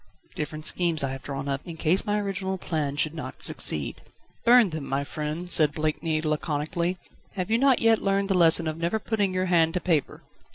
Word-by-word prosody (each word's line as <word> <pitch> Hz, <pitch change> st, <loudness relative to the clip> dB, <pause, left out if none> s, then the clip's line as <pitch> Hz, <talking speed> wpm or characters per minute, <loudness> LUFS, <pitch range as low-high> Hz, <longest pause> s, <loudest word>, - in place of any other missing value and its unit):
"Different 155 Hz, +1 st, -6 dB
schemes 170 Hz, -4 st, +3 dB
I 135 Hz, -, -2 dB
have 135 Hz, 0 st, -7 dB
drawn 135 Hz, 0 st, -6 dB
up, 140 Hz, 0 st, -2 dB
in 170 Hz, -2 st, -9 dB
case 175 Hz, +7 st, +1 dB
my 210 Hz, 0 st, 0 dB
original 195 Hz, -1 st, -3 dB
plan 155 Hz, -6 st, -3 dB
should 150 Hz, +1 st, 0 dB
not 145 Hz, -5 st, -7 dB
succeed." 75 Hz, -2 st, +1 dB, 0.4 s
"Burn 235 Hz, -5 st, +5 dB
them, 155 Hz, -3 st, -6 dB
my 135 Hz, +1 st, -2 dB
friend," 155 Hz, +5 st, -5 dB
said 150 Hz, -3 st, +5 dB
Blakeney 155 Hz, 0 st, -2 dB
laconically. 155 Hz, +3 st, -2 dB, 0.4 s
"Have 190 Hz, +1 st, -4 dB
you 230 Hz, -, +2 dB
not 270 Hz, -2 st, +4 dB
yet 225 Hz, -1 st, +3 dB
learned 195 Hz, 0 st, 0 dB
the 195 Hz, -, 0 dB
lesson 170 Hz, -2 st, +5 dB
of 155 Hz, 0 st, -4 dB
never 170 Hz, +6 st, -1 dB
putting 210 Hz, -3 st, -1 dB
your 185 Hz, 0 st, -1 dB
hand 165 Hz, -2 st, +2 dB
to -, -, +1 dB
paper?" 165 Hz, -5 st, -2 dB
165 Hz, 200 wpm, -25 LUFS, 150-190 Hz, 0.4 s, Burn